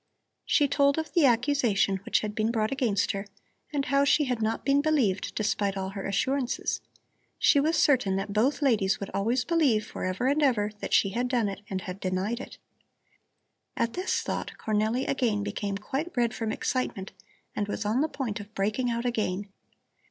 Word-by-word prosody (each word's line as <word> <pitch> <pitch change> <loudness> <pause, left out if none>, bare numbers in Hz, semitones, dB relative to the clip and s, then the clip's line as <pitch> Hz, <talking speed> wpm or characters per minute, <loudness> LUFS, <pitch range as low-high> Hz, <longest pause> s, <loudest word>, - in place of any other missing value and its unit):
She 290 - +3
told 280 +1 +3
of 320 0 -3
the 330 -6 +5
accusation 240 -6 +2
which 190 - 0
had 210 -1 -4
been 215 +1 0
brought 220 -2 0
against 245 -7 +1
her, 200 0 -5 0.4
and 285 -2 -1
how 275 +2 +3
she 290 +2 +4
had 250 -4 -1
not 220 +1 -1
been 280 +1 +4
believed 270 -11 +1
despite 205 -2 0
all 190 0 -2
her 195 0 -5
assurances. 260 +6 -1 0.6
She 285 - +4
was 315 +3 +2
certain 255 -11 +3
that 195 +1 -3
both 260 +8 +1
ladies 210 -8 +2
would 200 - -6
always 235 +6 0
believe 280 -11 +2
for - - -7
ever 185 +6 -1
and 285 +3 +2
ever 225 -7 +2
that - - 0
she 195 - +4
had 240 +5 -1
done 245 -4 +1
it 195 - -7
and 190 -1 -3
had 185 +1 -7
denied 190 +5 -1
it. - - -9 1.2
At 230 0 0
this 365 +1 -1
thought - - -3
Cornelli 220 +4 0
again 230 -6 0
became 205 -1 -3
quite 270 +11 -4
red 235 -2 +2
from 225 -1 -2
excitement 215 -6 -2 0.4
and 205 - -1
was 210 +1 -3
on 220 +6 +1
the 310 - +2
point 235 -7 -3
of 205 +1 -11
breaking 215 +6 0
out 235 +1 -2
again. 205 -4 -1
230 Hz, 190 wpm, -27 LUFS, 205-270 Hz, 1.2 s, the